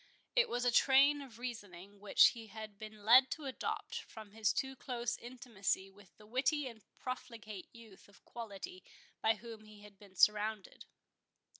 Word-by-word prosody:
It 480 -1 +4
was 245 +1 -1
a 245 - +4
train 275 +4 +5
of 255 -5 -11
reasoning 205 -5 -8
which 205 0 +6
he 225 -2 -9
had 215 -1 -9
been 215 -1 -10
led 255 +4 +8
to 310 - -9
adopt 460 - -3
from 220 - -12
his 215 0 +1
too 265 0 -2
close 240 -3 -3
intimacy 230 -6 -3
with 195 -2 -20
the 210 - -16
witty 265 +6 +1
and 230 -4 -8 0.2
profligate 225 -6 -7
youth 225 -4 -15
of 200 - -21
quality 200 -5 -8 0.4
by 220 0 +4
whom 225 0 -10
he 215 -1 -14
had 205 -2 -15
been 200 -2 -16
surrounded. 210 +1 +2
220 Hz, 165 wpm, -35 LUFS, 205-250 Hz, 0.4 s, led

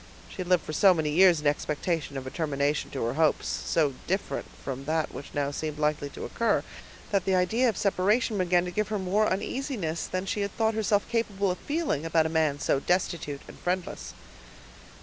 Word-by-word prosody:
She - - -12
had 185 -2 -4
lived 180 -2 +3
so 190 +3 +6
many 155 -2 0
years 175 -1 +5
in - - -10
expectation 150 0 -1
of 130 - -5
a 130 - -6
termination 145 -2 -1
to 135 - -3
her 115 - -1
hopes, 155 +1 +2
so 150 -4 0
different 190 +3 -2 0.2
from 135 0 -5
that 160 +1 -1
which 140 - -8
now 140 -1 0
seemed 150 +1 -4
likely 150 -1 0
to - - -7
occur, 230 - +1 0.5
that 200 -2 +1
the 190 - +2
idea 220 +8 +3
of 220 - -3
separation 210 +2 +1
began 180 -1 +3
to 180 - -4
give 215 +4 0
her 215 - -1
more 200 +3 +1
uneasiness 195 - -2
than 185 +1 -3
she 205 +2 -2
had 200 -1 -3
thought 225 0 +2
herself 210 -2 +1
capable 205 -5 0
of 180 - -5
feeling, 295 - -1
about 165 -1 +2
a - - 0
man 160 -3 +1
so 140 - +1
destitute 165 -4 -1
and - - -12
friendless. 180 0 -3
180 Hz, 200 wpm, -28 LUFS, 150-200 Hz, 0.5 s, so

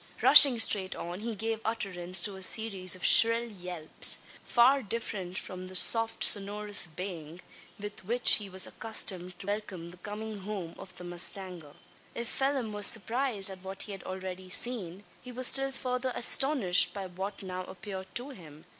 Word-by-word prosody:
Rushing 270 -4 +8
straight 200 -4 +3
on, 175 +2 -7
he 225 +1 -5
gave 225 +2 -3
utterance 185 -5 0
to 200 - -3
a 190 - -11
series 190 -3 +2
of 185 - -5
shrill 230 +1 +6
yelps; 180 -6 -2 0.3
far 260 +3 +3
different 200 -5 -6
from 185 0 -7
the 185 - -10
soft 225 +4 +2
sonorous 205 -1 +2
baying, 170 -1 -8 0.4
with 205 -1 -8
which 240 +6 +6
he 205 -2 -8
was 190 0 +2
accustomed 185 -5 -2
to - - -9
welcome 200 -4 -5
the 180 - -14
coming 210 +2 -7
home 190 -4 -6
of 185 -1 -11
the - - -10
mustanger. 175 -3 -2 0.4
If 235 - -5
Phelim 270 -4 -2
was 205 -1 +3
surprised 225 -2 0
at 190 -1 -11
what 190 0 -5
he 210 - -9
had 195 -2 -8
already 185 0 -7
seen, 200 -3 -3 0.2
he 250 - -11
was 255 +1 -3
still 270 +2 +3
further 255 -1 -3
astonished 245 -9 +2
by 195 -1 -5
what 190 +3 -7
now 185 -1 -6
appeared 190 0 -9
to 255 +4 -5
him. 155 - -14
200 Hz, 170 wpm, -29 LUFS, 185-225 Hz, 0.4 s, Rushing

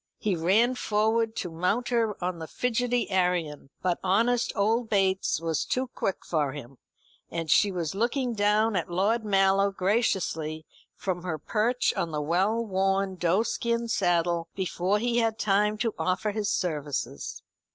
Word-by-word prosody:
He 205 -3 0
ran 200 +9 +3
forward 220 -1 0
to 175 - -4
mount 185 +9 0
her 230 -4 +1
on 180 -1 -2
the 160 - -6
fidgety 245 +2 -1
Arion; 180 -6 0
but 180 -2 +1
honest 230 +6 +2
old 225 +3 +1
Bates 190 -5 +1
was 165 -2 -1
too 255 0 -2
quick 195 - -3
for 150 -5 0
him; 135 -3 -10 0.5
and 165 -2 -3
she 205 - +5
was 170 -4 -3
looking 240 +4 0
down 210 +1 +2
at 175 - -1
Lord 205 +6 +1
Mallow 195 -1 +3
graciously 185 -6 -1 0.3
from 180 -2 -3
her 175 -3 -3
perch 225 - 0
on 170 - -1
the 150 -2 -3
well 190 +10 +1
worn 195 -1 0
doeskin 230 +6 0
saddle 175 -4 +1
before 190 +1 0
he 240 +2 +1
had 225 -1 +1
time 210 +1 +2
to 225 0 -1
offer 185 +3 0
his 210 0 -2
services. 145 - -3
195 Hz, 150 wpm, -27 LUFS, 175-225 Hz, 0.5 s, she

